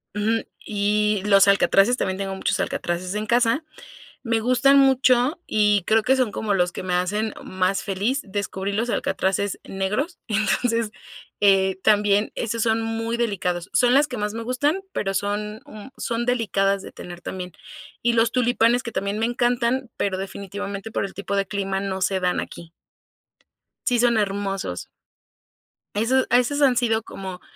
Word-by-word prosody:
Ujú. 220 +2 0 0.2
Y 210 -1 0
los 200 -1 +6
alcatraces, 200 +3 +4
también 190 0 -1
tengo 195 -1 -3
muchos 190 0 -1
alcatraces 180 0 -2
en 210 0 -2
casa, 240 +6 +2 0.6
me 230 -2 0
gustan 255 +4 +4
mucho, 265 +2 +3
y 210 -2 +3
creo 220 0 +3
que 265 +1 +3
son 255 -5 +1
como 205 -1 -1
los 180 -1 +1
que - - -6
me 180 -1 -1
hacen 210 +5 -1
más 185 +1 -1
feliz. 205 +8 -1
Descubrí 200 -1 -3
los 225 +4 -1
alcatraces 195 -2 -1
negros. 210 - -2
Entonces, 225 +1 +1 0.5
eh, 190 -2 +4
también 205 0 +3
esos 230 0 -2
son 225 0 +2
muy 225 +1 -2
delicados. 185 -6 -2
Son 245 0 +4
las 285 +2 +5
que 250 - -6
más 210 0 -2
me 230 - -4
gustan, 285 +9 0
pero, 195 -1 -1
son, 205 +2 -2
mm, 215 +2 -10
son 235 0 -2
delicadas 200 -5 +1
de - - -10
tener 175 0 -9
también. 180 -1 -6 0.5
Y 240 0 +2
los 225 0 +3
tulipanes, 245 0 +2
que 235 - -6
también 200 +2 -2
me 225 - +1
encantan, 240 +1 0
pero, 195 -2 -1
definitivamente, 200 +2 -6
por - - -1
el 195 - -6
tipo 200 0 -4
de 195 0 +1
clima, 195 -1 -2
no 190 -1 -3
se 190 0 +1
dan 180 0 +1
aquí. 170 -1 -9 1.1
Sí 245 -2 +2
son 235 -2 +3
hermosos. 195 - -2 1.1
Esos 255 +5 +2
esas 250 +4 +2
han 260 -3 +4
sido 225 -3 +1
como 190 -4 -8
210 Hz, 165 wpm, -23 LUFS, 195-235 Hz, 1.1 s, los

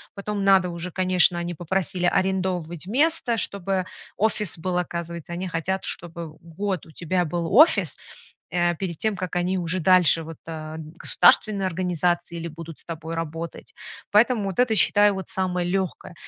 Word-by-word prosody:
Потом 200 0 -3
надо 190 -2 +4
уже, 170 +1 -5
конечно, 185 -1 +3
они 175 0 -3
попросили, 175 +1 -2
арендовывать 180 -3 -1
место, 270 -1 +2
чтобы 195 -2 -1 0.3
офис 210 -4 +3
был. 180 +2 -1
Оказывается, 170 -1 -5
они 180 +2 -4
хотят, 180 +3 -2
чтобы 170 -2 -4
год 180 +2 -4
у - - -15
тебя 180 +2 -1
был 170 +2 -3
офис, 310 +9 +5 0.5
э, 175 -1 +1
перед 170 -1 -4
тем, 215 +3 +1
как 185 -2 -5
они 180 +2 0
уже 180 +1 -1
дальше, 180 -1 +4
вот, 160 -1 -9
э, 155 -1 -6
государственные 180 +5 +2
организации 175 -1 -1
или 170 - -5
будут 165 0 -9
с - - -22
тобой 165 0 -6
работать. 165 0 -6 0.4
Поэтому 220 +1 +4
вот 195 -2 -4
это, 245 -3 +3
считаю, 205 0 +4
вот, 190 -1 -6
самое 180 -2 -1
лёгкое. 190 -2 -3
180 Hz, 160 wpm, -24 LUFS, 170-190 Hz, 0.5 s, офис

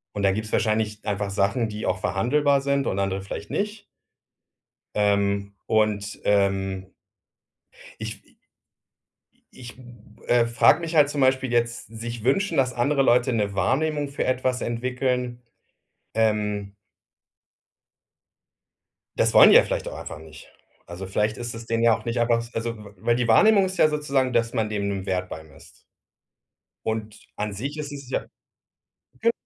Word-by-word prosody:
Und 100 - -2
da 100 - +4
gibt's 110 +3 -4
wahrscheinlich 110 -1 0
einfach 100 -1 -2
Sachen, 100 +4 0
die 105 0 -5
auch 90 0 0
verhandelbar 140 +7 +1
sind 140 0 0
und 95 - -1
andere 95 0 -1
vielleicht 100 +1 -7
nicht. 210 0 -3 1.1
Ähm. 100 -1 +1
Und, 105 -2 0
ähm 95 -1 0 1.1
ich 110 -2 -6
wi - - -30
i - - -33 1.2
ich, 120 -2 -10
hm, 120 -4 -16
äh, 120 -1 +3
frage 115 +7 +4
mich 165 -1 -5
halt 145 -2 +5
zum 145 -1 -2
Beispiel 130 -1 +2
jetzt, 120 0 0
sich 115 +1 -7
wünschen, 195 - +1
dass 130 -2 +2
andere 135 +3 +1
Leute 125 0 +3
'ne 105 -3 0
Wahrnehmung 145 +9 0
für 140 - -3
etwas 130 0 0
entwickeln. 125 0 -2 0.7
Ähm 105 -2 0 2.4
Das - - +2
wollen - - +9
die - - +7
ja - - +9
vielleicht - - -3
auch - - -8
einfach - - -8
nicht. 80 -2 -13 0.4
Also, 90 +2 -8
vielleicht 105 +3 0
ist 120 -1 -5
es 115 0 -8
denen 115 0 -1
ja 115 -1 +5
auch 110 - -15
nicht 120 +1 -1
einfach 115 0 +2
also, 115 0 -3
w 105 -1 -12
weil 115 +6 +1
die 120 -1 0
Wahrnehmung 200 - +5
ist 185 0 -5
ja 155 - +6
sozusagen, 140 -4 0
dass 115 -1 +1
man 110 -3 0
dem 105 -1 -2
'n 95 -1 -4
Wert 90 -1 -1
beimisst. 80 -2 -12 1.0
Und 110 -1 -3 0.2
an 105 0 -3
sich 140 +9 -5
ist 150 -1 -5
es 140 -3 -9
ja - - -2 1.0
ge 230 +1 +4
115 Hz, 160 wpm, -24 LUFS, 100-130 Hz, 2.4 s, wollen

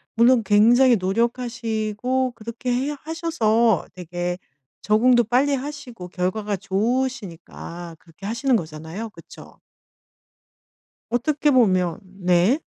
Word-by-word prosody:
물론 235 +1 +5
굉장히 235 +5 +5
노력하시고 235 +3 -1
그렇게 230 +3 -5
해 270 +4 -1
하셔서 235 - +1
되게 175 0 -4 0.5
적응도 240 +3 +4
빨리 260 +5 +2
하시고 260 -9 -7
결과가 200 +3 -2
좋으시니까 195 -6 -3
그렇게 170 +4 -14
하시는 235 +4 +1
거잖아요. 160 +5 -5
그쵸. - - -14 1.5
어떻게 290 +5 +1
보면 185 - +3 0.3
네. 180 - +3
225 Hz, 250 characters per minute, -22 LUFS, 185-255 Hz, 1.5 s, 물론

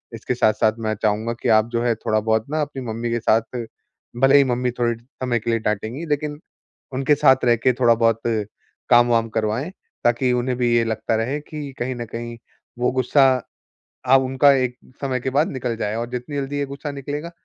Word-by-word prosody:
इसके 115 +3 -3
साथ-साथ 110 -2 +2
मैं 110 - 0
चाहूँगा 110 +2 0
कि 125 - 0
आप 110 0 +4
जो 115 0 0
है 120 -1 +2
थोड़ा-बहुत 110 0 0
ना, 155 +1 -1
अपनी 145 -2 -4
मम्मी 115 +2 -3
के 120 - 0
साथ 115 +2 0 0.6
भले 135 +1 +6
ही 140 - +6
मम्मी 125 0 0
थोड़े 120 -1 +1
समय 125 -1 -3
के 115 - -5
लिए 115 - +1
डाँटेंगी 110 +8 -3
लेकिन 150 0 -2 0.6
उनके 135 +3 +2
साथ 130 -2 +4
रहके 120 +1 +3
थोड़ा-बहुत 115 -2 +3 0.7
काम-वाम 120 -1 +4
करवाएँ, 110 +8 -1 0.3
ताकि 120 +2 +2
उन्हें 125 +1 0
भी 125 - +1
ये 120 - +4
लगता 110 0 -2
रहे 120 +6 -1
कि 150 -2 -8
कहीं 130 +2 -2
न 120 - -4
कहीं, 120 +1 -6 0.4
वो 125 - +1
गुस्सा, 130 +2 +3 0.8
अब 135 +1 +5
उनका 135 +2 +4
एक 130 -2 0 0.3
समय 130 -2 -1
के 130 - -2
बाद 150 - +2
निकल 125 -3 -3
जाए 105 -1 -2
और 115 +1 -3
जितनी 125 +3 -5
जल्दी 140 +1 -3
ये 140 - 0
गुस्सा 140 +2 -6
निकलेगा, 145 +4 -5
120 Hz, 190 wpm, -22 LUFS, 115-135 Hz, 0.8 s, भले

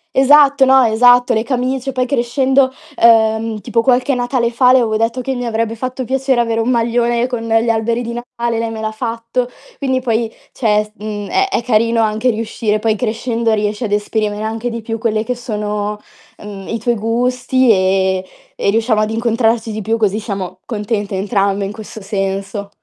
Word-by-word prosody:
Esatto, 280 +1 +6
no, 265 0 +5
esatto. 245 +2 +4
Le 220 - +1
camicie 255 +2 -2
poi 255 -1 0
crescendo 260 +1 +1 0.3
uhm, 220 -1 +3
tipo 230 0 0
qualche 255 +2 +2
Natale 245 -1 0
fa 250 +1 +4
le 260 - +6
avevo 225 -3 +1
detto 230 +3 0
che 265 +2 -2
mi 245 -1 -4
avrebbe 230 -1 -1
fatto 255 +2 -4
piacere 265 0 0
avere 230 -1 0
un 225 - 0
maglione 235 0 +1
con 245 -2 -3
gli 225 0 +1
alberi 230 +2 -1
di 235 - -5
Natale, 235 -1 -3
lei 230 - -2
me 225 -1 -6
l'ha 220 0 -2
fatto. 230 +2 -3 0.3
Quindi 260 -2 0
poi, 230 -2 -1 0.2
cioè 230 - -2
è - - -3
s 210 - -16
mhmm, 210 -1 -5
è 390 - +2
è 310 - -1
carino 230 0 +2
anche 220 +3 0
riuscire 220 -1 -1
poi 220 0 0
crescendo 230 0 -1
riesci 210 +2 -1
ad 205 - -4
esprimere 210 0 -1
anche 225 +2 -3
di 230 -1 -5
più 225 +1 -4
quelle 220 -1 0
che 250 - -2
sono, 210 -3 -3 0.4
mhmm, 200 -2 -8
i 230 - -2
tuoi 235 +2 0
gusti 245 +3 +1
e 190 -1 +2 0.3
e - - 0
riusciamo 220 +1 +2
ad 215 - 0
incontrarci 230 0 0
di 215 0 -4
più 225 +3 0
così 215 -1 +1
siamo 200 -4 -5
contente 210 -4 -3
entrambe 200 0 0
in 195 - -4
questo 220 0 -9
senso. 195 0 -3
230 Hz, 190 wpm, -16 LUFS, 215-245 Hz, 0.4 s, Esatto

